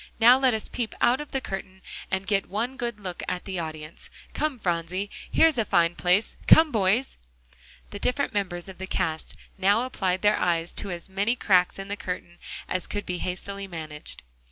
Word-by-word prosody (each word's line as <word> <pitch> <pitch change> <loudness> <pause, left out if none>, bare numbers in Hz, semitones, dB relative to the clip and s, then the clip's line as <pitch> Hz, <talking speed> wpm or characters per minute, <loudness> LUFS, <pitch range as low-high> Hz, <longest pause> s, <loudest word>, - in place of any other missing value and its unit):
Now 240 +2 +9
let 260 -4 +4
us 220 - -3
peep 235 -3 -3
out 250 +4 +3
of 295 - -8
the 270 - 0
curtain, 190 -4 -7 0.3
and 190 0 -1
get 195 -1 +1
one 230 +7 -2
good 235 -4 -4
look 185 -4 -6
at 180 -1 -3
the 190 -2 -3
audience. 155 -1 -7 0.2
Come, 305 -4 -1
Phronsie, 180 +1 -2 0.2
here's 320 -6 +4
a - - +4
fine 170 -4 +3
place; 180 +5 +2
come, 320 -1 +8
boys!" 215 +4 +1 0.7
The 205 - -6
different 250 +3 0
members 185 -4 -2
of 190 -1 -10
the 190 - -5
cast 160 -4 -2 0.2
now 200 +5 +4
applied 190 -7 -1
their 210 0 +4
eyes 170 -1 +1
to 200 - -4
as 175 -2 -4
many 200 +5 0
cracks 185 -6 +3
in 195 0 -6
the 200 - -3
curtain 180 -2 -6 0.3
as 185 -1 -2
could 205 0 -4
be 180 -1 -3
hastily 195 +2 -4
managed. 155 -4 -5
195 Hz, 190 wpm, -26 LUFS, 180-225 Hz, 0.7 s, Now